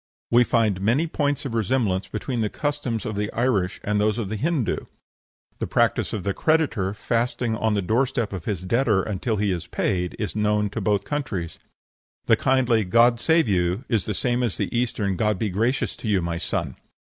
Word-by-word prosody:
We 120 +1 +6
find 110 -6 +1
many 120 +11 +2
points 145 -3 -1
of 130 - -4
resemblance 110 -4 0
between 120 +2 -3
the 105 - 0
customs 145 -6 -2
of 105 - -3
the 105 +1 -2
Irish 110 -7 0
and 105 0 0
those 105 +1 +1
of 110 -5 -3
the 110 - -3
Hindoo. 145 +1 -1 0.7
The - - -2
practice - - +1
of 105 -4 -3
the 100 - -1
creditor 130 - +1
fasting 120 +1 -1
at 110 0 0
the 100 - 0
door 115 +8 +2
step 120 -5 -2
of 90 -4 -6
his 95 -4 -2
debtor 110 -2 +2
until 110 +2 -2
he 100 -1 +1
is 85 -3 -3
paid, 90 -1 -1
is 105 -3 -3
known 105 -1 +1
to 110 - -4
both 100 0 +1
countries; 110 - -4 0.7
the - - +5
kindly 125 -4 +2
"God 115 +5 +4
save 160 -1 +3
you!" 90 +4 0
is 110 -6 +1
the 105 - -2
same 120 +3 0
as 120 -6 -1
the - - -2
Eastern 110 -6 0
"God 105 0 +1
be 105 0 -1
gracious 115 +7 0
to - - -6
you, 100 -3 +3
my 85 -1 -2
son!" - - -3
110 Hz, 200 wpm, -24 LUFS, 100-125 Hz, 0.7 s, We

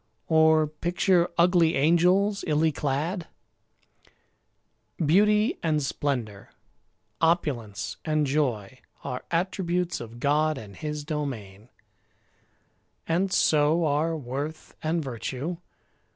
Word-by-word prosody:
Or 160 -1 +5
picture 175 +3 +1
ugly 170 -1 +4
angels, 180 +7 +3
illy 155 +1 +2
clad? 155 +6 -2 1.7
Beauty 210 - +3
and 155 -3 0
splendour, 125 -8 -3 0.7
opulence 145 - 0
and 155 -1 +1
joy, 130 -6 -1 0.2
Are 125 - -5
attributes 180 -1 -1
of 120 0 -9
God 150 +2 +1
and 105 -6 -10
His 150 +5 -5
domain, 125 - -5 1.4
And 185 +4 +1
so 155 0 +3
are 155 +2 0
worth 145 +4 -6
and 160 +1 -1
virtue. 135 +6 -4
155 Hz, 95 wpm, -26 LUFS, 135-170 Hz, 1.7 s, Or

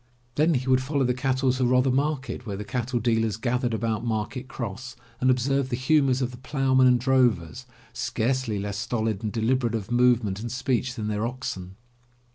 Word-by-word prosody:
Then 155 +4 +3
he 130 0 -2
would 130 0 +4
follow 140 +1 0
the 125 0 +2
cattle 130 0 +1
to 130 0 -1
Rother 125 +1 +3
Market, 135 -3 -1
where 100 -2 -4
the 105 - -5
cattle 120 +3 -2
dealers 115 -3 +1
gathered 120 +2 0
about 110 -1 -1
Market 115 +3 -3
Cross, 120 0 -6 0.2
and 130 - +2
observe 130 +1 +1
the 120 - -1
humors 135 0 +2
of 125 - -2
the 125 - -10
ploughman 130 0 +2
and 125 -1 +4
drovers, 125 - +1 0.3
scarcely 120 -1 -1
less 100 0 -3
stolid 110 -2 -1
and 110 -2 -2
deliberate 115 +1 0
of 110 0 -5
movement 120 -5 +3
and 115 +1 -5
speech 125 0 -1
than 110 -3 -4
their 105 +1 -1
oxen. 95 -7 -6
125 Hz, 185 wpm, -25 LUFS, 110-130 Hz, 0.3 s, would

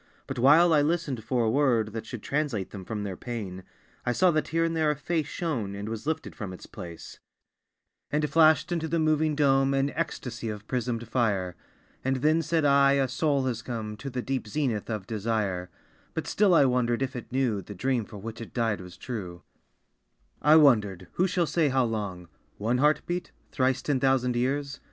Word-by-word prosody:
But 135 -2 -5
while 160 +7 +6
I 150 - +5
listened 145 -6 -1
for 120 +1 0
a 110 - +2
word 120 -6 +2
That 110 -1 -5
should 115 -3 -7
translate 135 -10 -2
them 95 -2 -7
from 105 0 -4
their 100 -2 -4
pain, 100 -5 -6 0.4
I 125 - 0
saw 180 +6 +4
that 155 -1 0
here 165 +1 +1
and 165 0 0
there 160 -1 +2
a 150 - +1
face 155 +1 -2
Shone, 125 - -3
and 100 +1 -5
was 115 +4 -5
lifted 160 0 -3
from 100 -6 -6
its 90 - -10
place, 85 -2 -10 0.9
And 150 +1 +1
flashed 155 +1 +4
into 165 -2 -1
the 165 +2 0
moving 155 -1 +2
dome 135 -1 +3
An 135 +1 +1
ecstasy 135 -8 -4
of 105 -1 -6
prismed 120 -2 -2
fire. 100 -7 0 0.5
And 130 0 +1
then 155 +5 +2
said 160 -1 0
I, 140 -1 +5
"A 135 -1 +2
soul 140 +1 0
has 120 -3 -2
come 110 -3 -5
To 140 - -6
the 125 -1 -4
deep 130 -4 -2
zenith 120 -3 -1
of 105 -4 -3
desire!" 105 -4 -2 0.5
But - - -2
still 200 -4 +3
I 145 - +6
wondered 125 -1 +1
if 130 0 -4
it 120 - -7
knew 125 -6 0
The 105 +3 -10
dream 125 +4 0
for 105 - -10
which 115 +3 -7
it 115 - -10
died 115 -5 0
was 90 -1 -11
true. 95 -8 -6 1.0
I 150 +1 +6
wondered 105 - +4
who 185 - +1
shall 175 -1 +1
say 160 -2 +1
how 130 -1 +2
long? 100 -6 -4 0.3
(One 115 +4 0
heart 150 +2 +3
beat? 175 +1 -3 0.2
Thrice 130 -1 +1
ten 140 -3 +1
thousand 125 -2 +2
years?) 140 +3 -1
130 Hz, 200 wpm, -27 LUFS, 110-150 Hz, 1.0 s, while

